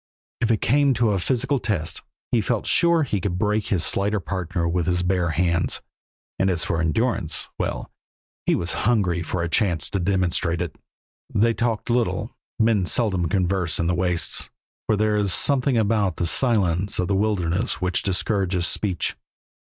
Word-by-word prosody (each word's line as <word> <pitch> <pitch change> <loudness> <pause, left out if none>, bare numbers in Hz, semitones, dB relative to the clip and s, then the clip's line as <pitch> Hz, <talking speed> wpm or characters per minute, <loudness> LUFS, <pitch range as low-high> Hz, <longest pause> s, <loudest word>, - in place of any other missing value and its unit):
If 115 - 0
it 110 -3 +1
came 140 +1 +3
to 115 -2 +2
a 100 - 0
physical 135 +7 0
test 95 -10 -2 0.3
he 120 - +3
felt 115 +1 -1
sure 170 -2 +3
he 105 -8 -2
could 90 -1 -2
break 105 +1 0
his 95 -5 +1
slighter 100 +2 +1
partner 90 -2 -3
with 85 0 -1
his 90 0 +1
bare 90 -1 +1
hands, 85 +1 0 0.6
and 95 - +2
as 90 -2 +1
for 80 - -1
endurance 80 -1 -1
well, - - -3 0.6
he - - +4
was 85 - -2 0.2
hungry 95 -7 +1
for 85 +1 -3
a - - -1
chance 85 -4 0
to 100 - -1
demonstrate 90 -2 0
it. 85 -4 -4 0.6
They 115 +3 +3
talked 115 0 -1
little; 120 -1 -1 0.2
men 110 -5 +2
seldom 95 -8 +1
converse 90 -2 0
in 85 - 0
the 90 - +1
wastes, 90 -1 -1 0.4
for 110 - +3
there 105 0 +2
is 100 -4 +1
something 130 - +2
about 105 -4 +1
the 85 - -1
silence 100 -3 +2
of 90 - 0
the 100 - 0
wilderness 100 0 0
which 90 0 +1
discourages 95 -2 0
speech. 95 -4 -1
95 Hz, 170 wpm, -23 LUFS, 85-110 Hz, 0.6 s, he